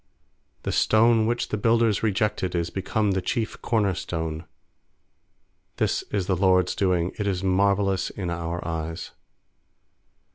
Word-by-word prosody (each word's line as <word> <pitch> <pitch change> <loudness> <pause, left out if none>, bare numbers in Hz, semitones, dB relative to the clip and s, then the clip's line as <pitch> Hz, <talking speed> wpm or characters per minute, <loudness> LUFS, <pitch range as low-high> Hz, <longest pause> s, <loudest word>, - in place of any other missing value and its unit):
stone 110 0 +4
which 120 +1 -1
the 105 - -1
builders 115 0 +2
re 110 - +2
jected 95 -2 -1
Is 85 -1 -1
become 100 +2 0
the 95 0 0
chief 110 +5 -3
corner 105 -5 +1
stone. 80 -2 -4 1.3
is 100 -3 -1
the 95 - +1
LORD'S 90 -1 +3
doing; 90 -2 +1
It 105 - -1
is 95 -1 -1
marvellous 95 0 +2
in 90 -4 -4
our 85 0 -4
eyes. 80 0 -4
95 Hz, 130 wpm, -25 LUFS, 85-105 Hz, 1.3 s, stone